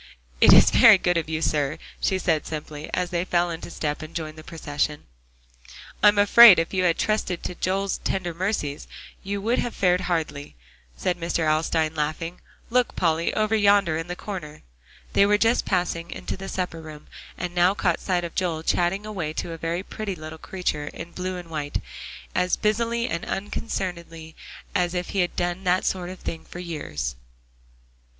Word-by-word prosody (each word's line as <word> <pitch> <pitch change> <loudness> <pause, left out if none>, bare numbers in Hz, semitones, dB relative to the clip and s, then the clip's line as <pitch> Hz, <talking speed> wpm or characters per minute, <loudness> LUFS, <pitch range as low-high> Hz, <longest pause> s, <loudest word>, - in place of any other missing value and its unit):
"It's - - +8
very 225 -4 +8
good 180 -1 +1
of 165 -2 -1
you, 160 0 -2
sir," 150 0 0 0.2
she 190 - +1
said 165 -4 0
simply, 150 -1 -6
as 180 0 -1
they 175 -1 0
fell 175 -1 +1
into 165 +1 -6
step 150 -3 -3
and 155 +1 -9
joined 155 -2 -4
the 155 - -11
procession. 150 -2 -3 1.0
"I'm 210 0 +6
afraid 205 0 +9
if 165 +3 -1
you 185 -1 +1
had 170 -2 +2
trusted 215 -5 -1
to - - -4
Joel's 190 +2 -1
tender 175 -3 -2
mercies, 170 -5 -2 0.3
you 200 +1 -3
would 235 +3 +1
have 240 - -2
fared 180 -1 +2
hardly," 160 -5 -3 0.4
said 180 -1 -1
Mr. 170 -1 -1
Alstyne, 155 0 +1
laughing. 155 +3 -3 0.3
"Look, 250 0 +2
Polly, 165 -1 +1
over 215 0 +2
yonder 200 -6 +4
in 165 +2 -3
the 180 - -4
corner." 175 -7 -7 0.5
They 200 - +5
were 210 0 +4
just 230 +3 +2
passing 175 -2 -1
into - - -5
the 195 0 -7
supper 180 -3 -3
room, 155 -1 -11 0.3
and 180 -1 -4
now 180 +2 +3
caught 175 -4 +1
sight 180 -2 -1
of 170 - -5
Joel 170 -4 -1
chatting 180 +5 +1
away 180 -8 -4
to 170 - -4
a 165 - -6
very 170 +3 -2
pretty 205 -2 -5
little 155 0 -9
creature, 155 -6 -3
in 165 +3 -8
blue 185 +1 -4
and 175 -1 -8
white, 145 -2 -3 0.5
as 180 0 +1
busily 230 +2 0
and 170 +1 -3
unconcernedly 170 -5 -4 0.4
as 180 -2 0
if 180 0 -2
he 195 - -2
had 175 -1 0
done 175 +1 -2
that 180 +1 +2
sort 180 -2 -1
of 185 - -7
thing 165 - -6
for - - -11
years. 145 - -4
175 Hz, 180 wpm, -24 LUFS, 160-190 Hz, 1.0 s, afraid